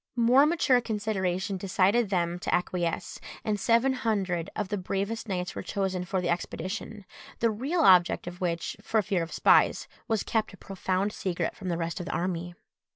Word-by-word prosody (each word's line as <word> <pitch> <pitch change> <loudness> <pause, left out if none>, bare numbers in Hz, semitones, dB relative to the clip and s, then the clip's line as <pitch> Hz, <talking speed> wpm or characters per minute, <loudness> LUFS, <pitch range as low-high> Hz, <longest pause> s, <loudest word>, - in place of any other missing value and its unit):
More 250 +4 +5
mature 295 -6 +3
consideration 195 -4 -2
decided 195 +4 +2
them 175 -2 0
to - - -3
acquiesce, 175 -1 -1 0.3
and 210 -1 0
seven 235 +6 +3
hundred 195 -9 -1
of 205 -3 -3
the 205 - -1
bravest 200 +5 -3
knights 180 -2 -2
were - - -5
chosen 190 -2 -2
for 185 0 -1
the 175 - -2
expedition, 190 +4 -4 0.3
the 230 -1 +2
real 270 +11 -1
object 180 -3 +5
of 175 +1 -8
which, 170 -2 -2
for 220 -2 +1
fear 195 -3 0
of 165 - -5
spies, - - +4 0.2
was 220 -3 0
kept 220 -3 -1
a - - -12
profound 190 +2 -2
secret 185 -5 -2
from 190 -3 -6
the 170 - -1
rest 170 +2 -3
of 175 - -6
the - - -3
army. 175 -1 -2
190 Hz, 180 wpm, -28 LUFS, 180-220 Hz, 0.3 s, More